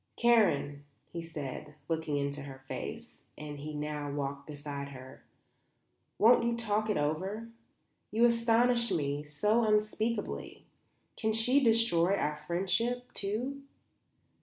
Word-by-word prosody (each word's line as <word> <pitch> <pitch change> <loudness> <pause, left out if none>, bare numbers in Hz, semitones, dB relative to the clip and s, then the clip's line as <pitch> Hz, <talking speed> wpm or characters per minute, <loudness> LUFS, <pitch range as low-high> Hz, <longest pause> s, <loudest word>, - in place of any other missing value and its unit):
"Karen," 150 -12 +3 0.3
he 170 - -3
said, 150 -2 -7
looking 160 -3 -1
into 140 +1 -2
her 135 -1 -8
face - - -6 0.2
as 150 -1 -7
he 150 +1 -6
now 150 -1 -3
walked 140 -1 -4
beside 145 -1 -6
her; 130 -1 -11 0.9
"won't 235 +2 +6
you 235 0 +1
talk 215 -1 0
it 210 - +2
over? 190 +10 -2 0.6
You 230 +3 +4
astonish 235 0 +3
me 145 -2 -1
so 210 +11 +1
unspeakably. 215 +1 -1 0.5
Can 220 -1 0
she 250 +6 +3
destroy 225 -6 +4
our 150 -6 0
friendship, 190 +10 -1
too? 245 +8 -3
180 Hz, 120 wpm, -31 LUFS, 145-230 Hz, 0.9 s, won't